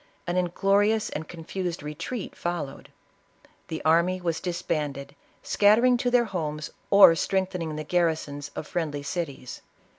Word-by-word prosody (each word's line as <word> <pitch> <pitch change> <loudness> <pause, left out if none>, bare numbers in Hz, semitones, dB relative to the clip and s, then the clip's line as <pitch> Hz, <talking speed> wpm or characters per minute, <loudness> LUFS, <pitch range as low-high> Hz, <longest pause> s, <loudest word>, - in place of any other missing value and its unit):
An 175 0 -2
inglorious 200 +4 +2
and 155 +1 -5
confused 175 0 -5
retreat 165 +9 -5
followed. 170 -6 -4 0.8
The 160 - -6
army 170 +3 +3
was 170 -2 -2
disbanded; 150 -5 -3 0.3
scattering 225 +5 +4
to 245 - 0
their 245 -1 +4
homes 155 -6 -4 0.2
or 200 -4 +9
strengthening 180 -2 -1
the 155 - -4
gar 175 +2 +2
risons 145 -3 -4
of - - -5
friendly 150 -4 -3
cities. 140 -5 -5
170 Hz, 130 wpm, -26 LUFS, 150-190 Hz, 0.8 s, or